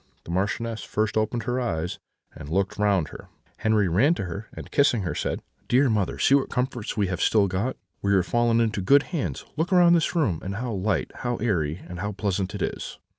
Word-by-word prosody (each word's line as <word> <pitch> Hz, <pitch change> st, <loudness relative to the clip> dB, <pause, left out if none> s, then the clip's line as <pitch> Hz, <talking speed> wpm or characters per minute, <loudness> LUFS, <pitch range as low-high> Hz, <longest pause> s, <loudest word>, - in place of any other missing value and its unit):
The -, -, -8 dB
Marchioness 110 Hz, +5 st, -1 dB
first 110 Hz, 0 st, -1 dB
opened 110 Hz, +2 st, 0 dB
her 125 Hz, +2 st, -1 dB
eyes, 85 Hz, -8 st, -2 dB, 0.3 s
and 70 Hz, -, -9 dB
looked 95 Hz, +4 st, -1 dB
round 100 Hz, -6 st, +2 dB
her. -, -, -11 dB, 0.3 s
Henri 110 Hz, -3 st, +2 dB
ran 120 Hz, -, +3 dB
to 95 Hz, -, -3 dB
her, 100 Hz, +6 st, -6 dB
and -, -, -10 dB
kissing 125 Hz, -7 st, +3 dB
her, 85 Hz, -5 st, -2 dB
said: -, -, -3 dB, 0.2 s
"'Dear 130 Hz, 0 st, +4 dB
mother, 105 Hz, -4 st, 0 dB
see -, -, +3 dB
what 140 Hz, -1 st, +3 dB
comforts 125 Hz, -4 st, -2 dB
we 105 Hz, -, +2 dB
have 95 Hz, -1 st, -3 dB
still 105 Hz, -3 st, +4 dB
got! 100 Hz, +8 st, -2 dB, 0.2 s
We 100 Hz, 0 st, +2 dB
are 95 Hz, -, +4 dB
fallen 120 Hz, +4 st, +2 dB
into 110 Hz, -3 st, +1 dB
good 140 Hz, +9 st, +5 dB
hands; 160 Hz, -, -2 dB
look 165 Hz, +5 st, 0 dB
around 180 Hz, -1 st, +6 dB
on 170 Hz, -, +6 dB
this 170 Hz, +1 st, +2 dB
room, 125 Hz, -, +1 dB
how 110 Hz, +6 st, -4 dB
light, 100 Hz, +1 st, -1 dB
how 120 Hz, 0 st, -2 dB
airy, 90 Hz, -9 st, -1 dB
and 90 Hz, -1 st, -7 dB
how 105 Hz, +3 st, -3 dB
pleasant 95 Hz, -2 st, -2 dB
it -, -, -2 dB
is!' -, -, -4 dB
105 Hz, 215 wpm, -25 LUFS, 95-120 Hz, 0.3 s, around